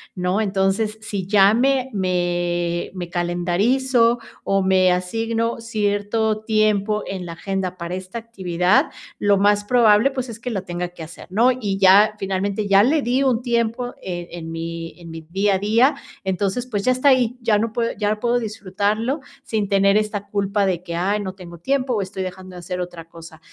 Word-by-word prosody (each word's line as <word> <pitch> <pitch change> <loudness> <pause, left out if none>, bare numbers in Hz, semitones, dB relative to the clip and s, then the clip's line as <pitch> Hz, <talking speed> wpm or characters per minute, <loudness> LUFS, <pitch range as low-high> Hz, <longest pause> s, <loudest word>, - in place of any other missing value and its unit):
¿no? 180 +4 0
Entonces, 200 +2 0
si 200 -4 -4
ya 200 0 +5
me 265 +2 +2
me 175 -2 -1
me 180 -2 -6
calendarizo, 220 +9 +1 0.2
o 195 0 +1
me 185 -1 +4
asigno 225 +5 -1
cierto 215 0 -1
tiempo 215 -1 +1
en 185 -2 -5
la 170 - -6
agenda, 185 +1 -3
para 170 +1 -4
esta 185 +4 -7
actividad, 190 -5 +1 0.3
lo 205 -1 +3
más 205 +1 +3
probable, 230 +2 +4
pues, 260 -1 -4
es 230 -1 -8
que 245 - -5
lo 200 -6 -3
tenga 175 -1 -4
que 175 -2 -10
hacer, 160 +1 -11
¿no? 230 +7 +4
Y 205 -6 -3
ya 200 +3 +6
finalmente, 195 +2 -2
ya 200 0 +6
le 290 +6 +3
di 255 +2 +1
un 250 -3 +2
tiempo, 235 0 -1
e 175 -2 -5
en 165 -2 -7
mi 165 +1 -6
en 170 -1 -11
mi 165 0 -8
día 195 +5 0
a 190 - -1
día. 230 +8 +3 0.3
Entonces, 195 +6 -1
pues, 205 -5 -2
ya 255 - +3
está 255 +3 +3
ahí, 250 -2 +2
ya 225 -3 +3
no 220 +2 -1
puedo 230 +1 -1
ya 210 0 0
puedo 240 +2 +1
disfrutarlo, 215 - -2 0.2
sin 210 -3 -2
tener 200 0 +4
esta 210 -1 -1
culpa, 200 0 0
de 180 -2 -1
que: 170 -2 -5
"Ay, 200 +5 0
no 190 -2 -5
tengo 175 -2 -11
tiempo, 265 +6 0
o 215 - 0
estoy 190 0 -4
dejando 185 0 -8
de - - -8
hacer 180 +1 -5
otra 175 -2 -7
cosa". 165 -1 -13
200 Hz, 190 wpm, -21 LUFS, 180-225 Hz, 0.3 s, ya